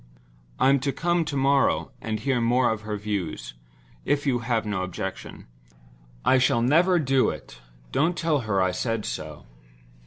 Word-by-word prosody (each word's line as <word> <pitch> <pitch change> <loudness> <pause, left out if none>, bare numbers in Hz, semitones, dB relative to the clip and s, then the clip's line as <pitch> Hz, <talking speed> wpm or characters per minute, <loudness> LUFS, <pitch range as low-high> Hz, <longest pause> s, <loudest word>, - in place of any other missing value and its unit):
"I'm 135 +1 +4
to 140 +2 -1
come 170 +2 0
to 145 -2 -3
morrow, 135 +1 +2
and 110 -1 -3
hear 125 +1 0
more 120 +1 +3
of 110 -1 -3
her 105 -1 -4
views—if 80 - -5
you 130 -3 +1
have 115 -1 -1
no 100 -3 -2
objection. 95 +1 -6 0.8
I 130 - +5
shall 120 -2 +2
never 170 +8 +4
do 135 -4 +2
it; - - -8 0.3
don't 170 +4 +1
tell 160 -3 +1
her 110 -5 -1
I 95 - +1
said 115 +3 -2
so. - - -6
120 Hz, 155 wpm, -25 LUFS, 105-140 Hz, 0.8 s, I